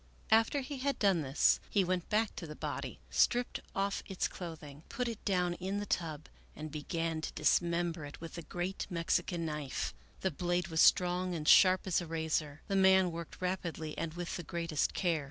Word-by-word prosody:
After 225 +6 +4
he 270 +1 -6
had 275 +1 0
done 195 -5 +3
this 135 0 +3
he 200 - +3
went 180 -1 -1
back 215 0 +1
to 170 - -5
the 150 - -8
body, - - -4
stripped 245 0 +2 0.2
off 195 0 0
its 190 -2 -1
clothing, 155 -5 -8
put 250 -3 -2
it 230 -3 -5
down 180 -3 +1
in 190 +3 -3
the 205 - -3
tub 160 -5 -2 0.3
and 155 0 -7
began 160 +2 -2
to - - -4
dismember 170 +1 +1
it 145 - -10
with 165 -1 -8
the 170 - -5
great 175 +3 -4
Mexican 170 0 0
knife. 150 -4 -3 0.3
The 190 - +1
blade 175 0 -1
was 160 -1 +2
strong 180 0 +4
and 155 -2 -4
sharp 185 -1 +7
as 185 -2 +1
a 175 - -6
razor. 160 -2 -2
The 195 - -1
man 190 -1 +5
worked 165 -1 -7
rapidly 170 -4 -3
and 165 0 -4
with 175 -1 -4
the - - -4
greatest 165 -1 -1
care. 170 -4 +1
175 Hz, 190 wpm, -33 LUFS, 160-190 Hz, 0.3 s, sharp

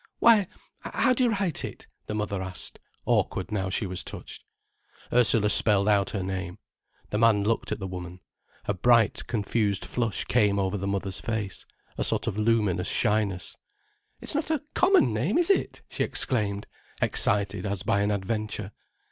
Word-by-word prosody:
"Why, 220 -5 +5 0.3
how 255 - +1
do 255 - +1
you - - +3
write 195 -8 -1
it?" - - -7 0.2
the 105 - -3
mother 105 -2 -2
asked, 95 -1 -6 0.3
awkward - - 0
now 95 -3 -1
she 100 +3 -1
was 90 -1 -3
touched. - - -9 0.7
Ursula 115 -3 +4
spelled 100 -2 +5
out 100 -2 +3
her 100 -3 -3
name. 95 -1 -4 0.5
The 105 - 0
man 110 -3 +4
looked 115 +2 -1
at - - -2
the 95 - -5
woman. 90 -1 -7 0.5
A - - 0
bright, 115 +2 +3
confused 105 -2 0
flush 115 -4 -2
came 105 -4 +2
over 95 0 0
the 100 0 -3
mother's 100 -1 -2
face, 110 -4 -4 0.3
a - - +1
sort - - +3
of - - -2
luminous 105 -5 +1
shyness. 105 -4 0 0.6
"It's - - -3
not 305 +1 -1
a 310 -4 0
common 380 +1 +4
name, - - 0
is 350 +2 +3
it!" - - -1
she - - -6
exclaimed, 105 -5 -2 0.3
excited 100 -1 0
as 100 -2 -2
by 100 - +1
an 100 - +1
adventure. 105 0 -3
105 Hz, 165 wpm, -26 LUFS, 95-115 Hz, 0.7 s, Why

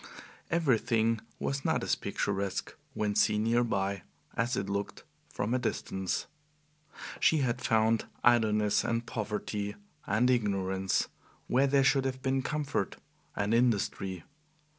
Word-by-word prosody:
Everything 115 -8 +2 0.2
was 135 0 -2
not - - +1
as - - +1
picturesque, 100 -1 -2 0.2
when 105 -1 0
seen 105 +1 +3
near 120 +2 +3
by, 100 -4 -1 0.3
as 120 +2 0
it - - -2
looked 100 0 -3 0.3
from 105 +4 -2
a 130 - +2
distance. 95 -6 -2 0.9
She 160 - +4
had 120 -1 -1
found 110 0 +2 0.2
idleness 110 -3 +4
and 115 0 -1
poverty 105 -2 -3 0.3
and 110 +5 +3
ignorance 95 -5 +1 0.4
where 135 +3 +3
there 140 0 +4
should 135 0 +3
have 130 0 -3
been 135 0 +1
comfort 145 +1 -2 0.4
and 100 +2 0
industry. 100 -6 +1
110 Hz, 125 wpm, -30 LUFS, 100-125 Hz, 0.9 s, She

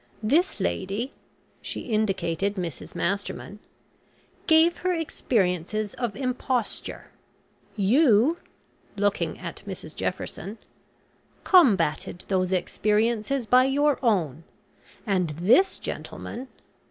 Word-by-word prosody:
This 325 - +2
lady," 205 +8 -2 0.5
she - - -4
indicated 200 -3 0
Mrs 175 -7 -5
Masterman, 200 +2 -3 0.9
"gave 325 +1 +5
her 365 0 0
experiences 215 - -1
of 235 -5 -3
imposture; 255 -2 -3 0.6
you," 240 - +4 0.6
looking 195 -5 0
at 170 -3 -7
Mrs 170 -5 -7
Jefferson, 190 +2 -4 0.9
"combated 200 - +3
those 185 -1 +1
experiences 215 +6 0
by 250 +4 +5
your 285 +1 +2
own, 165 - +1 0.6
and 185 -5 +1
this 245 - +4
gentleman." 255 +3 -6
215 Hz, 90 wpm, -26 LUFS, 190-260 Hz, 0.9 s, gave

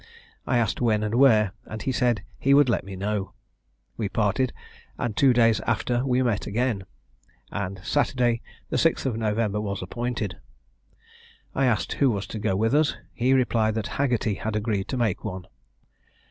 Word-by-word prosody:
I 120 - +2
asked 115 -1 0
when 110 -3 +2
and 105 +1 -2
where, 110 -6 +5
and 110 - -6
he 135 - 0
said 120 -6 +1 0.2
he 140 +1 +4
would 145 -2 +5
let 105 - +1
me 95 0 -8
know. 100 +1 -2 0.6
We 105 -4 -2
parted, 110 +5 +1 0.5
and 115 -4 -2
two 135 +3 +5
days 115 -3 +4
after 120 0 0
we 130 -1 +2
met 115 -5 0
again, 110 -2 -1 0.7
and 100 -2 -4
Saturday, 120 -3 +1 0.3
the - - +1
6th - - +2
of 130 -4 0
November, 105 -1 0
was 100 -2 -3
appointed. 110 -4 -3 1.1
I 135 -1 +2
asked 110 -5 0
who 140 - +6
was 105 -3 -1
to 110 - -3
go 95 - 0
with 110 +5 +1
us? 150 +1 +2 0.2
He 125 +3 +2
replied 115 -4 +2
that 110 -2 -2 0.2
Haggerty 120 -6 +1
had 110 +2 -4
agreed 105 -2 -1
to 130 - -3
make 110 -5 0
one. 95 -4 -5
110 Hz, 175 wpm, -25 LUFS, 105-125 Hz, 1.1 s, who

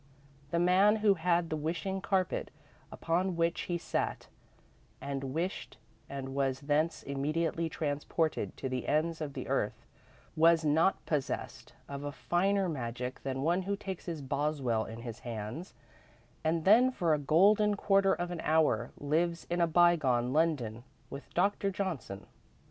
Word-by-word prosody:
The 170 - -1
man 185 +5 +5
who 205 - +7
had 170 -1 +1
the - - +1
wishing 170 +5 -3
carpet, 190 -2 0 0.4
upon 180 +2 -1
which 170 0 0
he 175 - 0
sat - - -3 0.7
and 140 -1 -4
wished 165 +8 -3 0.3
and 135 -1 -5
was 135 0 0
thence 150 +3 0
immediately 155 +4 -1
transported 155 +1 -2
to 135 - -3
the 130 -1 -3
ends 160 +2 0
of 145 -3 -4
the - - -6
earth, - - -1 0.5
was 165 0 +5
not 160 +6 +2
possessed 150 -4 -3
of 140 0 -6
a 145 - -3
finer 180 +10 +1
magic 125 -4 -4
than 135 0 -3
one 175 +4 +2
who 200 +2 -2
takes 190 -3 -7
his 160 -4 -4
Boswell 140 -5 0
in 115 +1 -8
his 115 -1 -7
hands 115 - -6 0.7
and 160 0 0
then, 230 +6 +6
for 170 -10 +1
a 150 - +1
golden 205 +8 +4
quarter 195 -1 +3
of 175 0 -4
an 175 - -4
hour, 160 0 +2
lives 165 +4 0
in 175 0 +1
a 170 - +4
bygone 155 -8 +3
London 135 -8 0 0.3
with 140 - -9
Doctor 200 +2 +2
Johnson. 165 - -4
160 Hz, 150 wpm, -31 LUFS, 140-175 Hz, 0.7 s, who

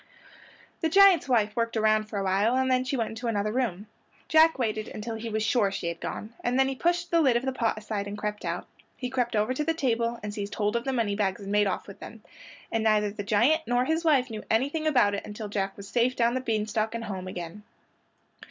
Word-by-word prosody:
The 325 - 0
giant's 385 -4 +6
wife 215 -4 +2
worked 230 -1 -1
around 215 0 +3
for 215 -1 -6
awhile 195 +4 +1
and 260 0 +1
then 255 0 +3
she 260 +1 -2
went 225 -2 -1
into 225 +2 -5
another 210 -2 0
room. 215 -5 -2 0.4
Jack 320 -1 +5
waited 215 -4 -2
until 220 +2 -6
he 225 +1 -5
was 215 0 -1
sure 215 -2 +2
she 170 -3 -3
had 170 - -6
gone, 220 +2 -6
and 245 +1 0
then 265 0 +4
he 270 - -1
pushed 345 +4 0
the 335 -1 +4
lid 260 -6 +4
of 245 - -3
the 265 - 0
pot 235 -4 -1
aside 210 -2 -4
and 205 +1 -6
crept 210 0 -4
out. - - -3 0.3
He 250 -1 -4
crept 245 -3 -1
over 215 +4 +1
to 300 - -2
the 325 +2 0
table 235 -5 0
and 210 -1 -4
seized 205 0 -5
hold 210 +1 0
of 235 - -1
the 270 - 0
moneybags 205 -5 0
and 200 0 -6
made 205 0 +3
off 190 - -2
with 200 - -12
them, 220 -1 -11 0.5
and 225 -1 0
neither 210 -1 +2
the 205 0 -6
giant 235 +10 +3
nor 245 +1 +2
his 320 +4 0
wife 270 -6 +3
knew 215 -1 -6
anything 285 +8 +1
about 245 -9 +3
it 200 - -3
until 210 +1 -7
Jack 195 -1 -2
was 200 -1 -9
safe 245 +4 +1
down 235 0 +2
the 255 - -1
bean 220 -4 -1
stalk 220 +1 -2
and 230 - -4
home 190 -4 -5
again. 180 +2 -7
225 Hz, 245 wpm, -27 LUFS, 210-255 Hz, 0.5 s, giant's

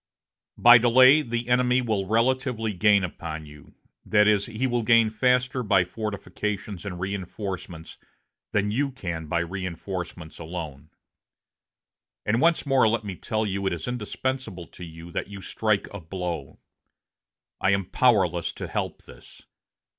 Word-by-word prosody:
"By 120 0 +8
delay, 130 +5 +6
the 120 -3 -3
enemy 125 0 +3
will 110 -6 -1
relatively 115 0 +1
gain 100 +1 +4
upon 80 -3 -5
you 75 -1 -15 0.3
that 105 0 +3
is, 105 -2 +3
he 115 +3 -2
will 120 -2 0
gain 115 -1 +4
faster 125 +3 +1
by 100 -5 +3
fortifications 100 -1 -5
and 90 -3 -5
reinforcements 95 -3 -6 0.5
than 105 0 +1
you 140 +6 0
can 85 -11 -5
by 85 +2 0
reinforcements 90 -1 -6
alone. 80 -3 -7 1.4
And 115 +4 +1
once 170 -1 +3
more 135 -4 +4
let 110 0 0
me 100 -3 -5
tell 110 +4 -2
you 100 -1 -2
it - - 0
is 85 -2 -6
indispensable 125 -4 -4
to 90 - -11
you 80 0 -10
that - - -3
you 100 0 -9
strike 105 +1 -1
a 100 - -6
blow. 85 -3 -5 1.0
I - - +2
am 100 -1 +2
powerless 95 -7 +2
to - - -6
help - - -4
this. - - -16
105 Hz, 145 wpm, -25 LUFS, 90-120 Hz, 1.4 s, By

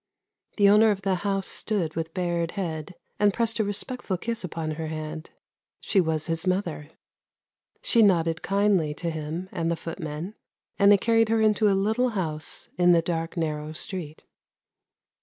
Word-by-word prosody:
The 200 -2 +5
owner 210 +2 +6
of 195 -2 -1
the 195 -1 +1
house 195 -1 -1
stood 185 -8 -2
with 165 0 -3
bared 175 -2 -1
head, 170 -3 -4 0.2
and 205 0 +4
pressed 225 +2 +1
a - - +3
respectful 205 0 -1
kiss 230 +4 -4
upon 165 -3 -4
her 160 +1 -4
hand. 155 +1 -6 0.5
She 195 - +2
was 160 -2 -1
his 165 +2 -2
mother; 175 -5 -1 0.9
she 235 - +4
nodded 165 -5 +3
kindly 195 -7 +1
to 170 +1 -3
him 160 +3 -5
and 165 -3 -2
the 170 - +1
footmen, 165 +2 -6 0.5
and 200 0 +7
they 205 - +7
carried 225 +1 +2
her 225 0 +2
into 215 -1 +3
a 195 - +2
little 220 +6 +1
house 160 -8 -4
in 175 0 +6
the 165 -1 +3
dark 165 0 -3
narrow 155 -1 -2
street. 160 -2 -4
180 Hz, 165 wpm, -26 LUFS, 160-205 Hz, 0.9 s, and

